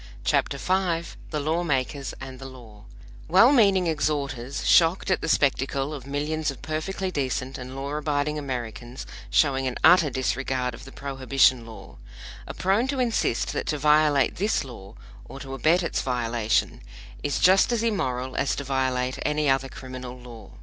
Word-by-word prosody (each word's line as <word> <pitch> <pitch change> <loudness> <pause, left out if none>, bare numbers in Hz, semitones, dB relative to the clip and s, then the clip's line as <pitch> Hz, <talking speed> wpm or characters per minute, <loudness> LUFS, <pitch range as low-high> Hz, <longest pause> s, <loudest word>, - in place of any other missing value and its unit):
CHAPTER 140 - +1
V 175 0 0 0.2
THE 150 - -2
LAW 160 +4 0
MAKERS 140 -2 -2
AND 130 -1 -9
THE 135 - -8
LAW 115 -5 -14 0.4
WELL 195 - +6
MEANING 200 -8 +4
exhorters, 140 -5 -2
shocked 170 +3 +4
at 185 - +1
the 165 - -3
spectacle 135 0 +1
of 135 -3 -8
millions 150 +2 -2
of 135 - -8
perfectly 175 +5 -3
decent 130 -3 -3
and 130 +1 -8
law 140 +1 -4
abiding 150 0 -1
Americans 120 -2 -6 0.2
showing 135 -3 +2
an 125 - -3
utter 175 -4 +6
disregard 130 -1 -1
of 130 - -11
the 135 - -11
Prohibition 135 -3 +1
law, 110 - -12 0.5
are - - -7
prone 200 +7 +1
to 270 -1 -2
insist 230 - 0
that - - -3
to 150 - 0
violate 150 -1 +3
this 205 +4 0
law, 115 -7 -11 0.3
or 135 - -10
to 135 -1 -8
abet 165 +6 +2
its 165 - -1
violation, 120 -3 -1 0.4
is 145 - -1
just 190 +5 +5
as 235 -2 0
immoral 130 - -1
as 140 - 0
to 140 - -4
violate 130 -1 -1
any 150 0 0
other 135 0 +1
criminal 130 -1 -8
law. 115 -4 -12
140 Hz, 165 wpm, -25 LUFS, 130-155 Hz, 0.5 s, WELL